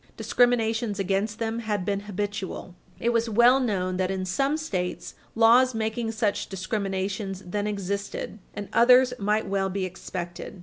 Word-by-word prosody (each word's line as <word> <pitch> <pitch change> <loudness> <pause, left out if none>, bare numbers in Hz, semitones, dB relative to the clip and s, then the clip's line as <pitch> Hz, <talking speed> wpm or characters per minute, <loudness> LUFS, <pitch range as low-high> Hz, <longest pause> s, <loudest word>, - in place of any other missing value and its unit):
discriminations 230 -3 +1
against 200 +2 -1
them 225 0 -2
had 210 -5 -2
been 200 0 0
habitual. 205 -2 -5 0.3
It 235 - +1
was 230 0 +1
well 240 +4 +5
known 185 -7 -1
that, 185 0 0
in 190 -1 -2
some 275 +11 0
States, 185 - -3 0.2
laws 240 +2 +5
making 225 +1 -1
such 215 -2 -1
discrimination 195 0 -2
then 205 +3 -2
existed, 200 +1 -4 0.2
and 205 -1 -5
others 250 +1 +6
might 210 +2 +1
well 195 0 0
be 190 0 -2
expected. 180 0 -7
205 Hz, 145 wpm, -26 LUFS, 195-230 Hz, 0.3 s, others